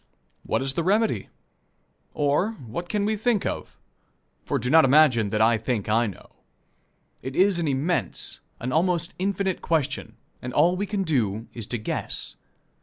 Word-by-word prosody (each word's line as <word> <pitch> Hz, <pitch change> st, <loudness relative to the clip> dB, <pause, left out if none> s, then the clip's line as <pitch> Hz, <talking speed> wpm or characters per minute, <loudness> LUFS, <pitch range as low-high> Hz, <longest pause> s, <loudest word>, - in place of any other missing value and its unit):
What -, -, -1 dB
is 135 Hz, 0 st, -1 dB
the 170 Hz, -, -1 dB
remedy? 210 Hz, +5 st, +1 dB, 0.9 s
Or, 150 Hz, +9 st, +1 dB
what 170 Hz, -, -7 dB
can 205 Hz, -1 st, 0 dB
we 215 Hz, +1 st, +1 dB
think 220 Hz, -1 st, +1 dB
of -, -, -4 dB, 0.7 s
for -, -, -1 dB
do 125 Hz, -, -2 dB
not 160 Hz, 0 st, +7 dB
imagine 130 Hz, -5 st, +5 dB
that 110 Hz, +2 st, 0 dB
I 115 Hz, 0 st, +4 dB
think 115 Hz, -2 st, -2 dB
I 115 Hz, +2 st, +3 dB
know. 100 Hz, -, -10 dB, 0.9 s
It 130 Hz, +1 st, -6 dB
is 190 Hz, -1 st, +3 dB
an 165 Hz, -, 0 dB
immense, 145 Hz, +6 st, -1 dB, 0.2 s
an 125 Hz, +2 st, -3 dB
almost 175 Hz, +2 st, +1 dB
infinite, 195 Hz, -1 st, -1 dB
question, 160 Hz, -5 st, -1 dB, 0.3 s
and 125 Hz, 0 st, -6 dB
all 170 Hz, +5 st, +4 dB
we 200 Hz, +2 st, -2 dB
can 200 Hz, -1 st, -1 dB
do 115 Hz, -, 0 dB
is 115 Hz, -3 st, -7 dB
to 120 Hz, -, -2 dB
guess. 110 Hz, -, -4 dB
155 Hz, 165 wpm, -25 LUFS, 120-185 Hz, 0.9 s, not